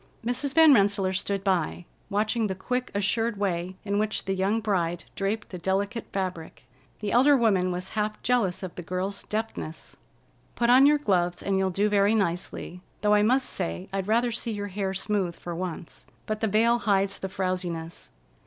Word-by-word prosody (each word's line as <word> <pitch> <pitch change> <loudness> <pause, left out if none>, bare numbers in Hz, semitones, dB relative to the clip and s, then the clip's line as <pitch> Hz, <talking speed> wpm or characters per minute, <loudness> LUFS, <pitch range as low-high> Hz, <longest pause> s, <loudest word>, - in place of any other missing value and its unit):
Mrs. 255 +3 0
Van 320 -2 +8
Rensselaer 200 -3 +2
stood 195 +1 -2
by, 180 -3 0 0.2
watching 215 +2 +1
the 190 - -3
quick, 250 +6 -2
assured 215 +2 +1
way 185 -2 -2
in 200 0 0
which 215 0 -1
the 195 - 0
young 195 +4 +1
bride 175 -6 -1
draped 205 +2 -2
the 180 - -7
delicate 200 +5 -1
fabric. 180 -8 -4 0.4
The 210 - -2
elder 275 +4 +5
woman 195 -6 +2
was 180 +1 -4
half 215 0 -2
jealous 220 -7 +1
of 185 - -5
the - - -7
girl's 185 +3 -3
deftness. 215 -7 -5 0.6
"Put 240 0 +2
on 265 +3 +7
your 295 +1 +5
gloves, 180 -10 0
and 195 -1 +1
you'll 190 0 +1
do 200 +3 +1
very 205 +1 +3
nicely, 180 -2 -2 0.2
though 210 0 +3
I 210 - +5
must 255 +5 +2
say 85 +1 -4
I'd 195 -1 -2
rather 235 +3 +2
see 230 0 -3
your 205 -1 -4
hair 195 0 -3
smooth 190 -3 -1
for 175 - -7
once. 175 -1 -6 0.2
But 215 0 -3
the 220 - +1
veil 230 +3 +3
hides 195 -2 +1
the 190 - -4
frowsiness. 180 -3 -3
200 Hz, 180 wpm, -26 LUFS, 185-220 Hz, 0.6 s, Van